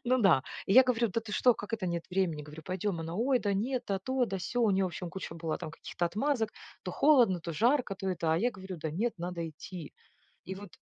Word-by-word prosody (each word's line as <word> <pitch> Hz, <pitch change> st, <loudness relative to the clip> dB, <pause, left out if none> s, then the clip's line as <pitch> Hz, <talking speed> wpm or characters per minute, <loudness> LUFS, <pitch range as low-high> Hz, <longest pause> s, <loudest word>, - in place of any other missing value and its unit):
Ну 255 Hz, +1 st, +3 dB
да. 175 Hz, -, +5 dB, 0.2 s
И -, -, +2 dB
я 260 Hz, -, +10 dB
говорю: 240 Hz, -2 st, +1 dB
"Да 220 Hz, +4 st, -1 dB
ты 220 Hz, -2 st, -8 dB
что, 245 Hz, +3 st, +5 dB
как 205 Hz, +1 st, -8 dB
это 215 Hz, -4 st, -1 dB
нет 170 Hz, -1 st, -2 dB
времени?" 180 Hz, -5 st, 0 dB
Говорю: 150 Hz, +2 st, -10 dB
"Пойдем". 185 Hz, -1 st, -2 dB
Она: 165 Hz, +1 st, -5 dB
"Ой, 250 Hz, +6 st, +2 dB
да 205 Hz, -4 st, 0 dB
нет, 245 Hz, +5 st, -1 dB
да 195 Hz, -1 st, 0 dB
то, 260 Hz, +6 st, 0 dB
да 195 Hz, -5 st, -3 dB
сё". 245 Hz, +7 st, -2 dB
У 220 Hz, -, +4 dB
неё 195 Hz, 0 st, +2 dB
в -, -, +2 dB
общем 175 Hz, 0 st, -6 dB
куча 190 Hz, -3 st, -6 dB
была 165 Hz, -1 st, -3 dB
там -, -, -6 dB
каких-то 165 Hz, +2 st, -4 dB
отмазок. 220 Hz, +3 st, 0 dB, 0.3 s
То -, -, -4 dB
холодно, 245 Hz, -, +5 dB
то 170 Hz, 0 st, -5 dB
жарко, 235 Hz, -, +2 dB
то 195 Hz, 0 st, -4 dB
это. 165 Hz, -3 st, 0 dB
А -, -, +3 dB
я 240 Hz, +7 st, +2 dB
говорю: 190 Hz, -4 st, -8 dB
"Да 160 Hz, 0 st, -3 dB
нет, 220 Hz, +10 st, -1 dB
надо 170 Hz, -1 st, -3 dB
идти". 160 Hz, +1 st, -9 dB, 0.5 s
И 190 Hz, -, -5 dB
вот 200 Hz, 0 st, -10 dB
195 Hz, 255 wpm, -31 LUFS, 170-230 Hz, 0.5 s, я